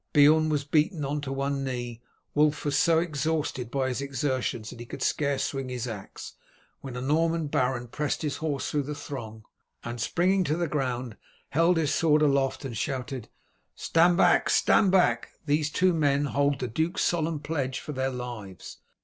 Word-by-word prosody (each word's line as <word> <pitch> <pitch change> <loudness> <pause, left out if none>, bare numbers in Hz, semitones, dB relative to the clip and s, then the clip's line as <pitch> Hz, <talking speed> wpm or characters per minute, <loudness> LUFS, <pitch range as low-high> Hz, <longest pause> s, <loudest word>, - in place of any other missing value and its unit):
Beorn 155 +2 +6
was 150 -2 0
beaten 150 +2 +1
on 145 +2 -2
to 135 -2 -5
one 140 0 -1
knee; 120 -3 -4 0.3
Wulf 150 0 +2
was 145 -1 0
so 165 +3 +4
exhausted 155 -5 -1
by 130 0 0
his 130 +1 -3
exertions 130 -5 -2
that - - -11
he 120 - -7
could - - -5
scarce 140 -2 0
swing 135 -2 -3
his 125 -1 -3
axe, 105 -4 -8 0.5
when 135 -3 -8
a 125 - -4
Norman 165 +4 +1
baron 125 -3 0
pressed 150 +6 -2
his 150 -3 -2
horse 150 -4 -2
through 145 - +1
the 145 +2 -5
throng, 110 -7 -7 0.4
and 120 0 -5
springing 185 +7 +2
to 155 +1 0
the 175 -1 0
ground 125 -6 -2 0.3
held 165 +4 +3
his 155 -3 +1
sword 155 -2 +3
aloft 140 -1 +1
and 120 -4 -5
shouted: 125 -1 -4 0.5
"Stand 170 +1 +3
back! - - +4
stand 195 -4 +4
back! 185 -1 +2
these 150 0 +1
two 180 +4 +2
men 145 -3 +2
hold 140 0 +1
the 125 - -3
duke's 160 - -1
solemn 165 -2 0
pledge 145 -4 -2
for - - -7
their 130 -1 -1
lives!" 120 -7 -7
140 Hz, 180 wpm, -27 LUFS, 130-155 Hz, 0.5 s, Beorn